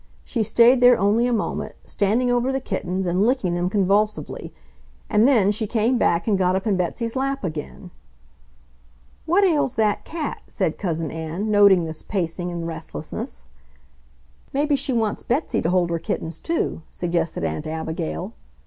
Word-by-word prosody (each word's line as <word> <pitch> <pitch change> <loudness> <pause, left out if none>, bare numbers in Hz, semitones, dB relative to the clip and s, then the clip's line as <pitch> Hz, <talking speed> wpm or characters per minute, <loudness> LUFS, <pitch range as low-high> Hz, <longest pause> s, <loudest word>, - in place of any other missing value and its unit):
She 235 - -2
stayed 240 +4 +5
there 245 0 +7
only 215 +5 +2
a - - 0
moment, 220 -3 -2
standing 230 +5 +1
over 245 +2 +1
the 270 - -1
kittens 190 -5 -3
and 180 +2 +1
licking 230 -7 +1
them 175 +1 0
convulsively, 205 +2 0 0.6
and 215 +2 +5
then 220 -8 +4
she 215 +1 -1
came 235 +3 +1
back 170 +4 +1
and 200 -3 +2
got 185 0 +2
up 190 - -2
in 210 -3 +2
Betsy's 225 +7 -2
lap 275 0 -1
again. 165 +1 -6 1.4
"What 360 +5 +4
ails 300 -8 +2
that 215 -2 +1
cat?" 320 -2 -5
said - - -2
Cousin 165 -5 -2
Ann, 165 +6 -3
noting 200 -4 +6
this 160 -1 -4
pacing 175 -2 -3
and 170 -1 -4
restlessness. 160 - -6 1.1
"Maybe 290 +1 +2
she 275 0 -1
wants 225 -4 0
Betsy 270 +7 -1
to 165 - 0
hold 180 -1 +2
her 170 - 0
kittens, 160 0 -4
too," 330 - -2
suggested 170 - -2
Aunt 80 - -3
Abigail. 160 - -4
205 Hz, 160 wpm, -23 LUFS, 175-245 Hz, 1.4 s, there